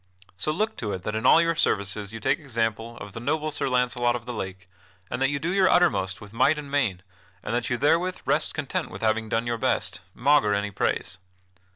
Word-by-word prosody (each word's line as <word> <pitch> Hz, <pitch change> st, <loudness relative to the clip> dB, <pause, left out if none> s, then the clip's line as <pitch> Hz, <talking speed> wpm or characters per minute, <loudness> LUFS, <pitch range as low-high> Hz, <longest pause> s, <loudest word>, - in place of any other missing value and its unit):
So 120 Hz, +12 st, -1 dB
look 210 Hz, +8 st, -1 dB
to 105 Hz, -3 st, -3 dB
it 90 Hz, -, -5 dB
that 105 Hz, -, -3 dB
in 110 Hz, 0 st, +1 dB
all -, -, +8 dB
your 165 Hz, 0 st, +3 dB
services 100 Hz, -8 st, 0 dB
you 110 Hz, -, -7 dB
take 145 Hz, -, +1 dB
example 115 Hz, -4 st, -2 dB
of 105 Hz, -, -9 dB
the 115 Hz, -, -6 dB
noble 155 Hz, +5 st, -1 dB
Sir 145 Hz, -, -1 dB
Launcelot 125 Hz, -1 st, +2 dB
of 120 Hz, -1 st, -6 dB
the 125 Hz, -, -5 dB
Lake, 95 Hz, -4 st, -6 dB, 0.5 s
and 120 Hz, -, -3 dB
that 135 Hz, -, +3 dB
you 145 Hz, -, -1 dB
do 165 Hz, +5 st, -2 dB
your 195 Hz, -1 st, +4 dB
uttermost 100 Hz, -, +2 dB
with 105 Hz, 0 st, -12 dB
might 130 Hz, +6 st, +3 dB
and 145 Hz, -2 st, -7 dB
main, 110 Hz, -11 st, 0 dB, 0.4 s
and 105 Hz, -, -3 dB
that 120 Hz, -1 st, -1 dB
you 125 Hz, -, 0 dB
therewith 165 Hz, +7 st, +1 dB
rest -, -, +1 dB
content -, -, -2 dB
with -, -, -9 dB
having 110 Hz, 0 st, +1 dB
done 115 Hz, +2 st, 0 dB
your 120 Hz, -1 st, -2 dB
best, -, -, 0 dB
maugre 135 Hz, -5 st, +3 dB
any 100 Hz, 0 st, -2 dB
praise. 95 Hz, 0 st, -1 dB
120 Hz, 225 wpm, -26 LUFS, 105-145 Hz, 0.5 s, all